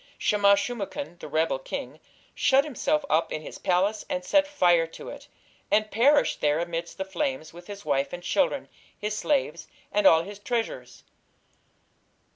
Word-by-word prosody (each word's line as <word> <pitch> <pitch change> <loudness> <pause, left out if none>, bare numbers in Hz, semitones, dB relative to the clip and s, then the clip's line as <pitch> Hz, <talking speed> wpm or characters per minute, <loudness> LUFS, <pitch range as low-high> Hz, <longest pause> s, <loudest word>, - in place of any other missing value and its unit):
Shamash 200 -1 +3
shum 245 -1 -4
ukin, 200 -2 -6
the - - -8
rebel 160 - 0
king, - - -6 0.3
shut 270 +1 +4
himself 230 - -1
up 160 +2 +1
in 155 - -4
his - - -9
palace 195 +3 +1
and 180 0 -2
set 290 +7 +3
fire 175 - +3
to 165 - -10
it, - - -10 0.4
and 215 0 +2
perished 280 +7 +3
there 150 0 +2
amidst 170 0 -4
the 190 - -3
flames 160 -5 -3
with 175 +1 -13
his 200 -3 -9
wife 140 -1 0
and 175 0 -7
children, 280 +8 0 0.3
his 210 0 -3
slaves 280 +5 -1 0.2
and 205 -2 +4
all 165 0 +6
his 200 +2 -9
treasures. 230 +1 -4
195 Hz, 165 wpm, -26 LUFS, 165-235 Hz, 0.4 s, all